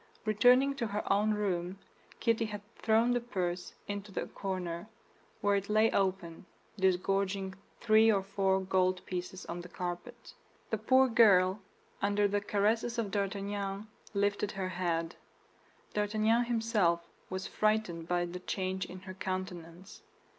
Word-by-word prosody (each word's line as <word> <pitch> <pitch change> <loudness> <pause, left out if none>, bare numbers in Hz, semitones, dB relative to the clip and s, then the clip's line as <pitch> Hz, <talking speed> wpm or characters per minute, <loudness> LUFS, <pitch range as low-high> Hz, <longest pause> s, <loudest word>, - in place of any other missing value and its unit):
Returning 245 +6 +5
to 235 -4 -1
her 205 -1 0
own 210 +2 +2
room, 185 -3 -2 0.4
Kitty 230 -1 +2
had 210 -1 -6
thrown 225 +2 +3
the 245 - +2
purse 180 -7 -3
into 205 -1 -4
a - - -2
corner, 185 -1 -4 0.5
where 205 -1 +3
it 200 +1 -4
lay 215 +1 +4
open, 185 -3 -1 0.3
disgorging 190 +1 +1 0.3
three 220 0 +5
or 195 -2 +1
four 195 -1 +1
gold 185 -1 +1
pieces 185 +1 -5
on 175 +1 -5
the 175 - -11
carpet. 175 0 -6 0.4
The 220 - 0
poor 260 +4 +5
girl, 200 -5 +5 0.4
under 205 +1 +2
the 205 0 0
caresses 220 +4 +1
of 220 -4 -1
D'Artagnan, 200 +1 -3 0.3
lifted 205 +1 0
her 190 -2 -3
head. 170 -2 -2 0.8
D'Artagnan 215 +3 +2
himself 220 -8 +1 0.2
was 185 0 -4
frightened 215 -6 0
by 175 0 +1
the 175 +1 -6
change 190 0 -3
in 185 0 -9
her 185 0 -8
countenance. 185 -1 -6
195 Hz, 140 wpm, -32 LUFS, 185-215 Hz, 0.8 s, Returning